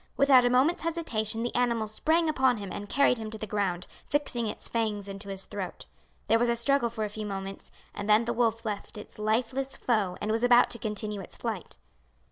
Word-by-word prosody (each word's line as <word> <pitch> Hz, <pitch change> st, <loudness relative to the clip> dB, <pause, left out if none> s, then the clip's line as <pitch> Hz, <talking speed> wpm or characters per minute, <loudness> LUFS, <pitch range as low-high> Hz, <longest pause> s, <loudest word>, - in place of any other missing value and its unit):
Without 275 Hz, -2 st, +6 dB
a -, -, +4 dB
moment's 260 Hz, +8 st, +3 dB
hesitation 235 Hz, -10 st, -2 dB
the 240 Hz, -, -2 dB
animal 235 Hz, -2 st, +1 dB
sprang 320 Hz, +10 st, +1 dB
upon 265 Hz, -5 st, +3 dB
him 200 Hz, -2 st, -6 dB
and 205 Hz, 0 st, -6 dB
carried 275 Hz, -4 st, +3 dB
him 220 Hz, -1 st, -5 dB
to 220 Hz, -, -6 dB
the 215 Hz, -, -5 dB
ground, 195 Hz, -4 st, -1 dB, 0.2 s
fixing 265 Hz, -5 st, 0 dB
its -, -, -4 dB
fangs 215 Hz, -3 st, -1 dB
into 195 Hz, +1 st, -7 dB
his 195 Hz, -1 st, -5 dB
throat. -, -, -6 dB, 0.4 s
There 225 Hz, -, +4 dB
was 240 Hz, 0 st, +2 dB
a 235 Hz, -, +2 dB
struggle 240 Hz, +1 st, +2 dB
for 225 Hz, -1 st, -4 dB
a -, -, 0 dB
few 210 Hz, 0 st, -5 dB
moments, 195 Hz, -1 st, -6 dB, 0.2 s
and 205 Hz, +1 st, -5 dB
then 215 Hz, +2 st, +5 dB
the 235 Hz, -, -1 dB
wolf 230 Hz, -1 st, +1 dB
left 210 Hz, 0 st, -4 dB
its 210 Hz, -, -11 dB
lifeless 250 Hz, +5 st, -1 dB
foe 215 Hz, -7 st, 0 dB
and 210 Hz, -, -2 dB
was 225 Hz, +1 st, +1 dB
about 245 Hz, 0 st, +6 dB
to 235 Hz, -, -4 dB
continue 210 Hz, -1 st, -3 dB
its -, -, -7 dB
flight. -, -, -5 dB
225 Hz, 215 wpm, -28 LUFS, 210-245 Hz, 0.4 s, Without